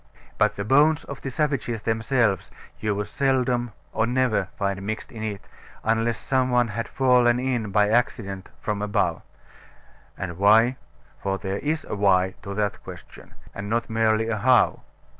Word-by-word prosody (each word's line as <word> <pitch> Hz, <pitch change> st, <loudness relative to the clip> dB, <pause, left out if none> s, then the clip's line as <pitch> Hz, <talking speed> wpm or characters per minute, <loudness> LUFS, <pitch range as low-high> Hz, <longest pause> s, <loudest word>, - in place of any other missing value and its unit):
But -, -, +3 dB
the 100 Hz, -, -4 dB
bones 150 Hz, +6 st, +4 dB
of 140 Hz, -, -8 dB
the 135 Hz, -, -4 dB
savages 130 Hz, -5 st, -1 dB
themselves 115 Hz, -3 st, +1 dB, 0.3 s
you 105 Hz, -2 st, -1 dB
would 105 Hz, +1 st, -3 dB
seldom 125 Hz, -2 st, 0 dB, 0.2 s
or 110 Hz, +1 st, +1 dB
never 120 Hz, -6 st, +1 dB
find 100 Hz, -1 st, -1 dB
mixed 110 Hz, +3 st, -5 dB
in 110 Hz, -, -8 dB
it 105 Hz, -3 st, -4 dB, 0.4 s
unless 115 Hz, +1 st, +1 dB
some 130 Hz, -1 st, 0 dB
one 120 Hz, -2 st, +2 dB
had 115 Hz, +3 st, -3 dB
fallen 125 Hz, -2 st, +3 dB
in 125 Hz, -5 st, -1 dB
by 105 Hz, +1 st, +3 dB
accident 105 Hz, -4 st, -1 dB
from 105 Hz, -1 st, -2 dB
above. 105 Hz, 0 st, 0 dB, 1.0 s
And 90 Hz, -2 st, -5 dB
why? 115 Hz, +5 st, +5 dB, 0.4 s
(For 95 Hz, 0 st, -1 dB
there 95 Hz, +1 st, -3 dB
is 155 Hz, +2 st, -2 dB
a -, -, -5 dB
Why? 95 Hz, -2 st, +3 dB
to 100 Hz, 0 st, -6 dB
that 105 Hz, -1 st, -1 dB
question: -, -, -12 dB, 0.2 s
and 100 Hz, 0 st, -6 dB
not 115 Hz, +1 st, -1 dB
merely 110 Hz, 0 st, +2 dB
a 110 Hz, -1 st, -1 dB
How?) 125 Hz, +3 st, +4 dB
110 Hz, 160 wpm, -24 LUFS, 100-125 Hz, 1.0 s, why